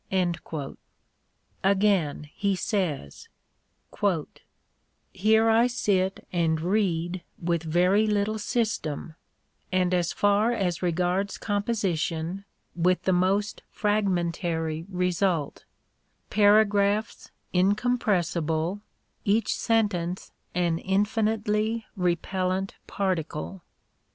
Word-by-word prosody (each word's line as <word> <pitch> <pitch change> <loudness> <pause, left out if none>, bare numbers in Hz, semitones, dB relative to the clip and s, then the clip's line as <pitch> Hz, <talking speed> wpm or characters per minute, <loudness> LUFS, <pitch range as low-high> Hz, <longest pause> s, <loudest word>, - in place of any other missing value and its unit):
Again, 195 -7 +2
he 200 -1 0
says: 175 - -3 1.8
Here 220 +3 +3
I 230 +2 +5
sit 195 -6 0
and 165 -2 +1
read 175 -1 0 0.2
with 170 -1 0
very 180 +6 +3
little 210 +1 0
system, 205 - -2 0.6
and 185 -1 +2
as 175 -2 +1
far 205 +3 +2
as 180 -7 -1
regards 180 +3 0
composition 195 -4 -1 0.3
writh 180 +1 +2
the 190 - +2
most 195 +4 +1
fragmentary 170 -5 -1
result: 180 -4 -1 0.7
paragraphs 205 +1 +3 0.2
incompressible, 185 -4 +1 0.4
each 210 +2 +1
sentence 200 -6 0 0.2
an 170 -2 +1
infinitely 215 +2 0
repellent 185 +1 -1
particle. 185 -1 -3
190 Hz, 75 wpm, -26 LUFS, 175-210 Hz, 1.8 s, I